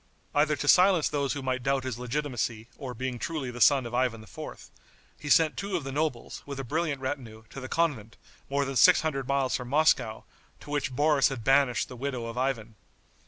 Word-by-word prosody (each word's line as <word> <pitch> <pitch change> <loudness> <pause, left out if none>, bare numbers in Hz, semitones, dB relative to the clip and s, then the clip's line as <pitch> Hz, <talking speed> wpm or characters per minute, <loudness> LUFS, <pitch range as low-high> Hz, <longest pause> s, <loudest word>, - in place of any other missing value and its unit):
Either 150 +1 +3
to 145 - -4
silence 180 -1 +5
those 140 -2 -1
who 140 -2 -5
might 130 -1 -1
doubt 135 +1 0
his 125 -3 -4
legitimacy 125 -4 -3
or 130 -4 -7
being 130 +1 -4
truly 150 -5 -3
the 120 0 -8
son 135 -1 +5
of 120 - -7
Ivan 120 -3 0
IV., 95 - -10 0.5
he 150 - -6
sent 160 +1 +4
two 200 -1 -2
of 160 - -5
the 135 - -5
nobles, 145 -3 -3
with 140 -1 -7
a - - -3
brilliant 150 +1 -2
retinue, 125 -5 -5
to - - -7
the 130 -1 -7
convent, 135 -10 -1 0.3
more 140 0 0
than 135 0 -4
six 180 +7 +6
hundred 135 -5 -2
miles 140 -1 +1
from 125 - -4
Moscow, 130 -5 +2 0.4
to - - -12
which 135 -3 -2
Boris 145 0 +3
had 130 -5 -6
banished 135 0 +3
the 125 - -10
widow 125 -2 -4
of 115 0 -6
Ivan. 125 -4 -2
135 Hz, 210 wpm, -28 LUFS, 125-145 Hz, 0.5 s, six